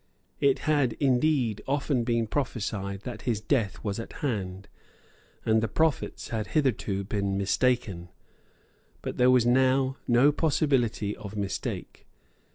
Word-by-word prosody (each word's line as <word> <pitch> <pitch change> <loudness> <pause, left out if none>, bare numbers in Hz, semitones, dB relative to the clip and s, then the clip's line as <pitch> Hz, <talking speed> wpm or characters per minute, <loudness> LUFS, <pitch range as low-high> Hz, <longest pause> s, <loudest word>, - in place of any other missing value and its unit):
It 140 -1 +3
had, 145 -6 +3
indeed, 130 -4 +1
often 140 -2 0
been 115 -1 +1
prophesied 105 -6 -3
that 120 0 -7
his 115 -4 -1
death 110 -3 -1
was 100 -1 -2
at 115 - -7
hand; 100 -8 -3 0.8
and 110 0 +3
the 115 - 0
prophets 160 +6 -1
had 110 -2 -2
hitherto 105 -8 0
been 100 -1 -1
mistaken. 100 -3 0 0.9
But - - -4
there 125 0 +5
was 125 -2 +5
now 130 +2 +3
no 125 +4 +5
possibility 135 -9 +1
of 105 0 -9
mistake. 100 -1 -4
120 Hz, 130 wpm, -27 LUFS, 105-135 Hz, 0.9 s, there